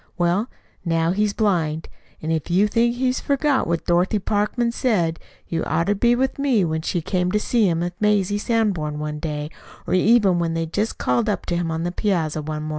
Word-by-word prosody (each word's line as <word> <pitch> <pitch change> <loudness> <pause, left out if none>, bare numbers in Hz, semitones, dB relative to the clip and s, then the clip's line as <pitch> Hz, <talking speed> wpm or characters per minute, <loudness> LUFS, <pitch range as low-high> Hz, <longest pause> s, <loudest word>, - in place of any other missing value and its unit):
Well, 180 +7 +1 0.3
now 165 -1 +1
he's 210 +2 +1
blind. 165 -7 0 0.4
An' 160 - -1
if 160 0 -2
you 190 +4 +3
think 235 +3 +1
he's 255 0 0
forgot 280 -1 +1
what 170 0 -1
Dorothy 175 +4 +2
Parkman 210 +4 0
said, 180 -10 0 0.3
you'd 165 -1 -2
oughter 170 +6 +1
been 235 +4 +2
with 265 +2 -1
me 255 -9 +2
when 160 -1 -2
she 170 +2 -2
came 180 0 0
to 210 - +3
see 220 -2 +2
him 165 0 0
with 175 +1 -2
Mazie 205 -1 +2
Sanborn 200 -11 0
one 150 0 -4
day, 150 -1 -4 0.3
or - - -2
even 195 -1 +4
when 165 -1 -1
they 165 0 -1
just 205 +7 -2
called 235 -2 +1
up 200 -4 -2
to 175 - -1
him 170 -1 -1
on 160 0 -2
the 175 - -1
piazza 170 -6 -1
one 150 0 -4
mornin'." 155 - -5
180 Hz, 205 wpm, -22 LUFS, 165-215 Hz, 0.4 s, even